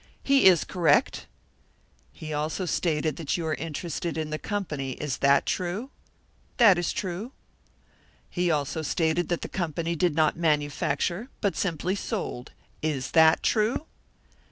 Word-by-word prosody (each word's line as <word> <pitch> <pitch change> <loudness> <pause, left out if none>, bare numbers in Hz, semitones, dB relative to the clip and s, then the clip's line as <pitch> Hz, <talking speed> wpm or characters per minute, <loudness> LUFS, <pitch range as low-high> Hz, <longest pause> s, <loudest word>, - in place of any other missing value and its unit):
"He 275 -1 +4
is 180 -4 +6
correct." 175 -4 +1 0.8
"He 155 -1 -7
also 155 +5 -2
stated 155 -4 0
that 165 0 -2
you 170 - -3
are 160 - 0
interested 165 +3 -4
in 155 -1 -3
the 155 - -3
company. 155 -10 -3
Is 150 -1 -4
that 140 0 +3
true?" 195 +9 -3 0.7
"That 205 -7 +6
is 175 - -1
true." 195 +7 -4 0.9
"He 175 -1 -1
also 150 0 -1
stated 160 +2 0
that 175 - -1
the - - -4
company 170 -1 -2
did 170 -1 +1
not 155 -1 +3
manufacture, 155 - 0
but 200 -3 0
simply 180 0 -1
sold. 195 - -4 0.3
Is 150 -4 -2
that 160 -1 +5
true?" 225 +7 +1
165 Hz, 140 wpm, -26 LUFS, 150-185 Hz, 0.9 s, is